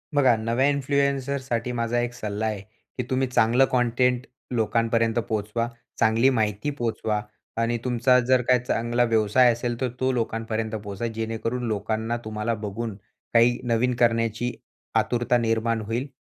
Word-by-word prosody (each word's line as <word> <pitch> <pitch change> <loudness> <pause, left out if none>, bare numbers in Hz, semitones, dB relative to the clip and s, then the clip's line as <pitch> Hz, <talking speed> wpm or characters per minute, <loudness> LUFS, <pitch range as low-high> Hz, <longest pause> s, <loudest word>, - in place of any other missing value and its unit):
बघा, 130 -4 +5
नव्या 115 +5 +1
इन्फ्लुएन्सरसाठी 140 -3 0
माझा 115 +1 0
एक 120 0 -2
सल्ला 110 -3 -3
आहे, 105 -3 -2 0.4
की 125 - -1
तुम्ही 130 0 +1
चांगलं 125 +1 +4
कंटेंट 125 0 +2 0.3
लोकांपर्यंत 115 0 +1
पोहोचवा, 110 +2 -1 0.3
चांगली 115 +4 +4
माहिती 110 0 0
पोहचवा. 110 -3 -1 0.4
आणि 115 +1 +1
तुमचा 125 +1 +3
जर 125 +1 +3
काही 125 -1 +5
चांगला 120 0 0
व्यवसाय 115 +2 +4
असेल 120 0 -3
तर 130 - +1
तो 130 0 +2
लोकांपर्यंत 115 -2 -2
पोहोचवा, 105 +1 -4
जेणेकरून 115 +2 -3
लोकांना 110 +2 -1
तुम्हाला 110 +1 -2
बघून 105 +1 -4 0.4
काही 120 +1 +5
नवीन 120 +1 +1
करण्याची 115 0 +1 0.5
आतुरता 120 +1 +1
निर्माण 115 -1 0
होईल. 120 +6 -2
115 Hz, 135 wpm, -25 LUFS, 110-125 Hz, 0.5 s, बघा